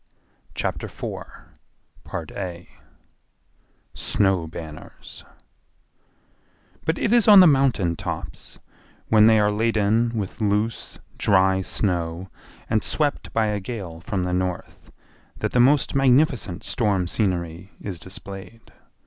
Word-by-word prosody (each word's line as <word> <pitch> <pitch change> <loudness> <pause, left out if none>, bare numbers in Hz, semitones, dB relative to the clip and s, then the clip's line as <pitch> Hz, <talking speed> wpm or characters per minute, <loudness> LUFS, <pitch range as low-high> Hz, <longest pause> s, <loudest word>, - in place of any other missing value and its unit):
Chapter - - -3
4 - - -9 2.4
Snow 95 -5 0
Banners 80 -1 -10 1.6
But 160 - 0
it 230 - +1
is 235 -3 +4
on 205 -2 +10
the 185 - +9
mountain 135 - +3
tops, - - -6 0.5
when 110 -1 +6
they 110 -1 +6
are 105 0 +3
laden 110 +1 +1
with 105 +2 -5
loose, 105 +2 -1 0.2
dry 95 -1 +3
snow 90 -2 -2 0.4
and 110 -1 +1
swept 150 -2 -1
by 115 -1 +1
a 105 -1 -1
gale 95 -6 -7
from 95 +1 -3
the 90 0 -2
north, 90 -1 -4 0.5
that - - -2
the 125 - +1
most 135 +4 +4
magnificent 130 - +2
storm 100 -6 +1
scenery 90 -2 -2
is 95 -5 -6
displayed. 100 +3 -8
105 Hz, 110 wpm, -23 LUFS, 90-115 Hz, 2.4 s, on